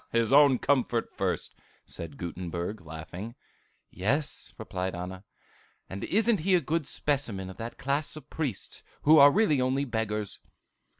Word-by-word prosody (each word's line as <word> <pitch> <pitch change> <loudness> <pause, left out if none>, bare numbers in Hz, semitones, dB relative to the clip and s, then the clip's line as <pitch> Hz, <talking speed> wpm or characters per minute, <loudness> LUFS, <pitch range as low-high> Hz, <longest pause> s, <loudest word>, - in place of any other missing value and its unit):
'" - - -39
"His 115 +2 +2
own 140 -2 +7
comfort 120 -3 +1
first!" - - -2 0.3
said 80 -4 -7
Gutenberg, 90 +3 -4
laughing. 85 +8 -8 0.6
"Yes," 135 - 0
replied 90 0 -4
Anna, 90 +2 -6 0.6
"and 95 +1 -6
isn't 220 +1 +2
he 185 +4 +3
a - - +5
good 160 -1 -1
specimen 115 -10 -1
of - - -13
that 115 +1 -6
class 140 +3 -1
of 150 -2 -10
priests, 140 -12 -4 0.2
who 155 +1 +7
are 140 +1 +10
really 155 -6 +3
only 130 +2 +1
beggars? 110 -4 -2
120 Hz, 145 wpm, -28 LUFS, 95-145 Hz, 0.6 s, are